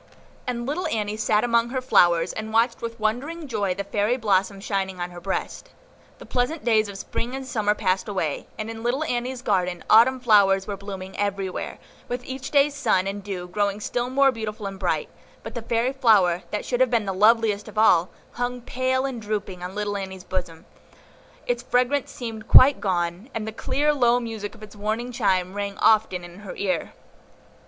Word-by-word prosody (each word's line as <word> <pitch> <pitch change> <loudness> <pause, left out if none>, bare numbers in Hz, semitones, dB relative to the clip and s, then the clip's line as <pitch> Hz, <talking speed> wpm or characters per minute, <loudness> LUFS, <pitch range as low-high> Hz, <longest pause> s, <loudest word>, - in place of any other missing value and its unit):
And 240 -1 -2
little 305 +7 -2
Annie 210 -1 -2
sat 215 -1 +1
among 235 -1 +2
her 260 +1 -1
flowers, 175 -9 +3
and 220 0 -5
watched 230 +2 +2
with 230 0 -5
wondering 280 +10 -2
joy 205 -7 -1
the 200 - -3
fairy 210 +5 0
blossom 200 -3 +1
shining 190 -2 -2
on 175 0 -4
her 175 0 -10
breast. 195 - -4 0.5
The - - -12
pleasant 255 +5 -1
days 220 -3 +3
of 200 - -7
Spring 240 +5 -4
and 270 0 -5
Summer 215 -4 0
passed 185 0 0
away, 185 -8 -2
and 215 - -4
in 225 0 -8
little 245 +6 0
Annie's 250 -2 -3
garden 180 -5 0
Autumn 245 +4 +6
flowers 200 -5 +4
were 205 - -4
blooming 195 -1 -8
everywhere, 195 -2 -2 0.3
with 245 0 -4
each 265 +1 -6
day's 285 0 +4
sun 225 -10 +1
and 200 +1 -4
dew 185 -3 -5
growing 200 +2 -1
still 240 +3 -2
more 270 +1 +4
beautiful 220 -3 -5
and 195 -1 -6
bright; - - 0 0.4
but - - -7
the 240 - -4
fairy 235 +3 0
flower, 205 -10 +4
that 210 - -3
should 245 - -1
have 260 -1 +4
been 230 -3 +1
the 195 - -2
loveliest 210 +1 +3
of 215 - -11
all, 180 -5 +5 0.2
hung 245 0 -3
pale 260 +2 -1
and 255 -4 -4
drooping 205 -4 -4
on 180 +2 -6
little 205 0 -2
Annie's 190 -2 -6
bosom; 175 -3 -5 0.8
its 245 -1 -1
fragrance 250 +3 +1
seemed 225 -3 -7
quite 275 +2 +8
gone, 175 +3 -1
and 220 -1 -3
the - - -3
clear, 290 +6 0
low 245 -3 +3
music 225 -3 -6
of 220 - -14
its 210 -1 -11
warning 220 +4 -3
chime 190 -6 +1
rang 200 -1 -4
often 215 -4 +3
in 175 +2 -11
her 205 -2 -8
ear. 185 -5 -2
215 Hz, 195 wpm, -24 LUFS, 195-245 Hz, 0.8 s, quite